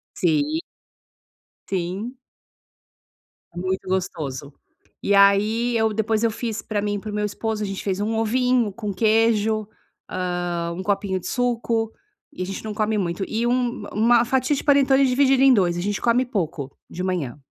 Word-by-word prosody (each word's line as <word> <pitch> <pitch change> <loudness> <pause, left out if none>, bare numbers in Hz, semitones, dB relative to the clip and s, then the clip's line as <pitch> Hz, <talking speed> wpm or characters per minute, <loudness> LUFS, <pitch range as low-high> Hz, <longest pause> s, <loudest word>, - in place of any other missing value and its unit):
Sim. 310 -1 +1 1.1
Sim. 190 +7 -3 1.4
É 175 - -14
muito 185 +1 -2
gostoso. 150 -7 -3 0.5
E 200 - +1
aí, 210 +4 +4
eu 220 -1 +1
depois, 220 +1 0
eu 230 - +3
fiz 225 -1 -4
pra 210 -2 -2
mim 205 0 -1
e - - -3
para 215 +1 -7
o - - -7
meu 210 0 0
esposo, 215 +1 -3
a - - -1
gente 195 -1 -5
fez 195 -1 -1
um 220 +2 -1
ovinho 245 0 +2
com 205 -1 -5
queijo, 220 0 +2 0.4
hã, 175 -2 -2
1 185 - -5
copinho 195 -1 0
de - - -7
suco 235 -2 0 0.4
e - - -8
a - - -1
gente 195 +3 -6
não 215 -1 -4
come 215 0 0
muito, 180 0 -2
e 225 +2 -1
um 245 +1 0
uma 235 +2 +4
fatia 260 +3 +1
de - - -4
panetone 275 -2 +4
dividida 265 +1 +3
em 270 - +7
2, 175 -6 +2
a - - -2
gente 205 +1 -2
come 245 +2 +3
pouco 160 - -3 0.2
de 180 - -5
manhã. 170 -9 -2
215 Hz, 175 wpm, -23 LUFS, 190-235 Hz, 1.4 s, em